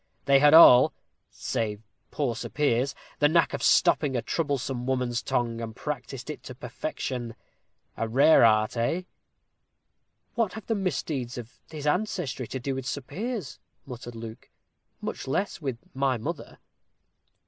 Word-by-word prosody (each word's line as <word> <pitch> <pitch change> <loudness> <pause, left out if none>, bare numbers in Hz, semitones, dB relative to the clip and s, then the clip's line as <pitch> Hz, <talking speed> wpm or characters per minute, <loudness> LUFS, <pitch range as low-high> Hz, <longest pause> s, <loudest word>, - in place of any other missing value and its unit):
They 140 -1 +5
had 150 +2 +6
all, 155 -3 +9 0.4
save 110 -3 -3 0.3
poor 135 -6 -1
Sir - - -6
Piers, 140 -2 +1 0.2
the 145 - +5
knack 165 +1 +3
of - - -3
stopping 140 -4 +3
a 120 - -2
troublesome 135 -5 -2
woman's 125 -2 0
tongue, 115 -1 -1
and 110 -1 -6
practised 135 -1 -5
it - - -9
to 130 - -9
perfection. 125 -4 -5 0.6
A 115 - -2
rare 135 +4 +6
art, 110 -1 +4
eh?" 120 +10 0 1.3
"What 230 -6 0
have 220 - -8
the 225 - 0
misdeeds 150 - -2
of 120 -1 -8 0.2
his 155 -2 -7
ancestry 150 - -1
to 130 - -5
do 135 +2 -3
with 130 -1 -5
Sir 140 - -3
Piers," 185 - -5 0.3
muttered 120 -2 -8
Luke, 115 0 -9 0.5
"much - - -5
less 175 +7 -2
with 135 -5 -3 0.2
my 135 -1 +1
mother?" 150 +8 -6
130 Hz, 150 wpm, -27 LUFS, 120-150 Hz, 1.3 s, all